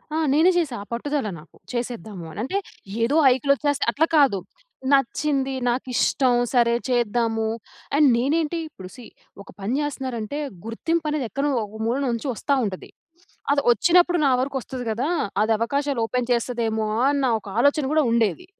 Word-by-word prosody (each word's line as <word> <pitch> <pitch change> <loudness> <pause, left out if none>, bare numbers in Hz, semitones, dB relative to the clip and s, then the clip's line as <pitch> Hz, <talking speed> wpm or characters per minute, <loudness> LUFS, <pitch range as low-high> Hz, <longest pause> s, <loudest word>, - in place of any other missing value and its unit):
ఆ! - - +1 0.2
నేనే 330 +5 +5
చేశా. 295 -8 0
ఆ - - -15
పట్టుదల 285 0 -2
నాకు 155 - -18 0.2
చేసేద్దాము 220 -7 -5
అని. 180 - -9
అంటే, 380 +10 -2 0.5
ఏదో 275 +6 +1
హైక్‌లోచ్చేస్తే 280 +2 +2
అట్లా 310 +6 +2
కాదు. 265 -10 +4 0.5
నచ్చింది, 270 0 +1
నాకిష్టం, 250 +1 +1 0.2
సరే 235 -1 +4
చేద్దాము. 230 -2 +1 0.5
అండ్ 295 -1 +5
నేనేంటి 310 +6 0
ఇప్పుడు, 185 -8 -11
సీ 245 -3 -11 0.4
ఒక - - -19
పని 215 +6 -2
చేస్తున్నారంటే, 265 -2 -4 0.3
గుర్తింపు 315 +8 -2
అనేది, 280 -6 -1
ఎక్కనో 280 +1 -1
ఒక 220 +2 -10
మూల 240 +4 0
నుంచి 235 +4 -3
వస్తా 280 +5 0
ఉంటది. 185 -2 -6 0.6
అది 285 0 +3
వచ్చినప్పుడు, 350 - +4
నా 270 - +4
వరకు 270 0 -2
వస్తది 250 -1 -7
కదా! 245 +7 -1 0.4
అది 225 - 0
అవకాశాలు 280 +3 -1
ఓపెన్ 250 0 -2
చేస్తదమో, 225 -2 -1 0.2
అన్న 280 -2 0
ఒక 205 - -15
ఆలోచన 285 +2 +3
కూడా 310 - +4
ఉండేది. 235 - +1
255 Hz, 150 wpm, -23 LUFS, 230-290 Hz, 0.6 s, నేనే